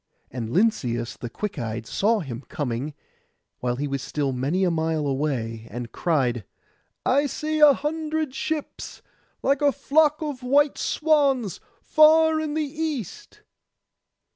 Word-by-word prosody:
And 115 -3 -4
Lynceus 125 - 0
the 120 - -7
quick 200 - -5
eyed 115 -1 -4
saw 215 - +1
him 130 -6 -6
coming, 140 +1 -3 0.6
while 125 -1 -1
he 145 +3 -2
was 140 -1 -3
still 140 0 -2
many 140 +9 0
a 180 - +2
mile 160 -2 0
away, 130 -6 -2
and 120 -1 -6
cried, 130 - 0 0.6
'I 280 +3 +3
see 310 +3 -2
a 300 -2 +8
hundred 310 -1 -2
ships, 310 +2 -5 0.4
like 275 +1 +2
a 290 -1 +4
flock 300 +3 +2
of 290 -4 -4
white 280 +3 +2
swans, 280 - +1 0.2
far 315 0 +5
in 310 -1 -3
the 310 - +1
east. 305 - -5
210 Hz, 140 wpm, -24 LUFS, -, 0.6 s, a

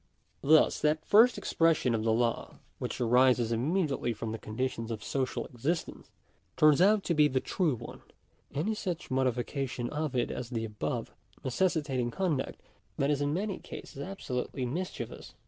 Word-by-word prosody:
Thus, 155 +2 +5
that 155 +1 +1
first 225 +4 +6
expression 165 -7 +2
of 110 -1 0
the 115 - +2
law 115 +1 0 0.2
which - - -4
arises 125 -1 +4
immediately 140 0 0
from 110 0 -5
the 110 - -5
conditions 115 +1 -3
of 110 -2 -4
social 130 -2 -2
existence, 140 +7 -3 0.5
turns 155 +1 +6
out 205 +1 +5
to 170 - 0
be 150 -2 +5
the 130 -2 0
true 160 -1 0
one: - - -9 0.5
any 175 +10 -1
such 180 -9 -4
modification 130 -1 -1
of 150 -3 -2
it 120 - +1
as 125 -2 -5
the 115 -3 -2
above, 105 -8 -3 0.3
necessitating 140 -4 0
con 175 +1 0
duct - - -5 0.4
that 140 +1 +2
is 145 -1 0
in 145 0 +1
many 195 +5 -2
oases - - -9
absolutely 135 -7 -4
mischievous. 175 +9 -5
135 Hz, 160 wpm, -30 LUFS, 120-165 Hz, 0.5 s, first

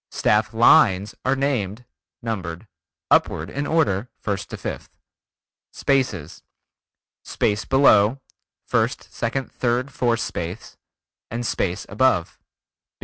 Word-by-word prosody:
Staff 105 0 +1
lines 105 -3 +5
are 130 +1 +2
named 125 -5 -2 0.4
(numbered) 95 -5 -4 0.5
upward - - +2
in 145 +2 -3
order, 125 - +1
first 100 -1 -4
to - - -6
fifth. - - -7 0.7
Spaces: 120 - -1 0.8
Space 105 +2 -1
below, 130 -3 +4 0.5
first - - -1
second 130 +3 -3
third 125 +2 -1
fourth 120 -2 +1
space, 90 +7 -5 0.5
and 120 +2 -4
space 90 -5 -2
above. 95 -6 +1
115 Hz, 100 wpm, -22 LUFS, 100-130 Hz, 0.8 s, lines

